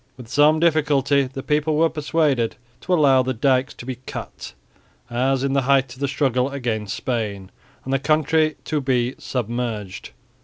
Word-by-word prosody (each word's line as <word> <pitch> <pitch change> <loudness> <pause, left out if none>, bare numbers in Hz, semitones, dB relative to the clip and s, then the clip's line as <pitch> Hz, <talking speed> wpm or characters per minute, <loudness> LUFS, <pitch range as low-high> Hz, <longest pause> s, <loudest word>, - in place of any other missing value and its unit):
With 125 -3 -11
some 150 +4 +4
difficulty 145 -4 +2
the 135 0 -6
people 150 +1 +1
were 165 +1 +4
persuaded 150 -6 0 0.2
to 185 - -6
allow 140 -5 +5
the 130 0 -2
dykes 130 +2 +1
to - - -10
be 130 -1 -5
cut, - - -7 0.6
as 130 +2 +1
in 140 0 0
the 140 - +2
height 135 -1 +2
of 130 - -16
the 140 - 0
struggle 130 -2 0
against 115 -7 -3
Spain, 105 -6 -3 0.3
and 135 - -2
the 135 - +2
country 155 +1 +2
to 150 -2 -1
be 125 -2 0
submerged. 115 -5 -4
135 Hz, 165 wpm, -22 LUFS, 125-150 Hz, 0.6 s, allow